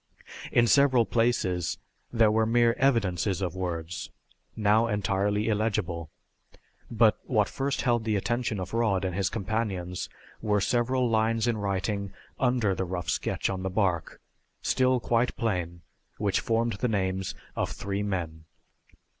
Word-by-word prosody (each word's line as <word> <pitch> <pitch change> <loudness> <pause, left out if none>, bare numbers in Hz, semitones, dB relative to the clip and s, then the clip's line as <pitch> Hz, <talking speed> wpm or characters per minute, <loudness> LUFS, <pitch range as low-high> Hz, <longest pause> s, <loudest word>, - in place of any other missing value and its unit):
In 120 - +4
several 130 0 +4
places 110 -8 0 0.3
there 115 -3 +4
were 110 0 +2
mere 120 0 +4
evidences 100 -8 +1
of 90 -2 -3
words, 85 -3 -4 0.5
now 110 +2 +3
entirely 105 0 0
illegible. 100 -7 -1 0.8
But - - +3
what - - +2
first 140 +1 -2
held 120 -3 +2
the 110 -1 0
attention 115 +1 -1
of 95 +2 -6
Rod 105 -5 +1
and 90 - -2
his 95 +1 0
companions 95 -4 -3 0.3
were 105 -2 +2
several 125 +4 +1
lines 115 0 +1
in 120 -2 +1
writing 100 0 -2 0.3
under 125 -6 +2
the 95 - -2
rough 90 -1 -4
sketch - - -1
on 95 -1 -3
the 95 - -2
bark, 90 -4 -1 0.4
still 130 0 +2
quite 120 +1 +1
plain, 90 -6 -2 0.4
which 100 -3 +1
formed 115 0 0
the 125 - +1
names 95 -3 -1 0.2
of - - -1
three 100 0 -3
men. 85 -6 -3
105 Hz, 140 wpm, -27 LUFS, 95-115 Hz, 0.8 s, In